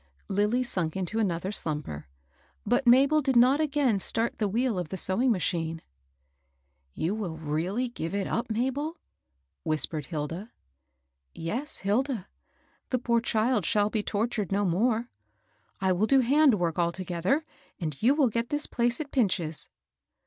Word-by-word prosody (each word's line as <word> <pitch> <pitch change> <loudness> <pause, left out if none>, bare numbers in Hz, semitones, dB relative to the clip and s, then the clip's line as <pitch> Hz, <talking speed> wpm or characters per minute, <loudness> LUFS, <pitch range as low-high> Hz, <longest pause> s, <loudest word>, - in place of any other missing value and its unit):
Lilly 210 +6 +1
sunk 180 -8 -1
into 190 +4 -2
another 185 -2 -1
slumber. 150 - -3 0.6
But 270 - +1
Mabel 275 +5 +6
did 265 -2 0
not 255 +5 +5
again 280 -8 +1
start 225 +4 -1
the 210 - +1
wheel 225 0 0
of 175 -3 -4
the 190 - -4
sewing 230 +8 +2
machine. 165 -4 -1 0.6
" 65 0 -46
You 170 +5 -1
will 195 -7 -4
really 165 +10 -1
give 180 -5 -4
it 200 -1 -1
up, 235 +1 -2
Mabel? 265 +8 -1 0.3
" - - -51 0.3
whispered 155 -2 -1
Hilda. 165 +8 -5 0.4
" 65 0 -50
Yes, 275 - -3
Hilda; 215 +1 -1 0.6
the 255 - +1
poor 235 -1 +1
child 225 -1 +1
shall 205 +4 +2
be 215 - 0
tortured 210 -1 -2
no 200 +1 +1
more. 225 +6 +1 0.7
I 190 -1 +1
will 190 +4 +2
do 270 +1 +5
hand 275 +1 +5
work 175 -3 -1
altogether, 180 - 0 0.3
and 155 -6 -4
you 260 +5 +4
will 285 -5 +3
get 230 +2 -2
this 295 0 -1
place 240 -1 0
at 295 -2 -5
Pinch's." 180 - 0
210 Hz, 155 wpm, -28 LUFS, 170-245 Hz, 0.7 s, Mabel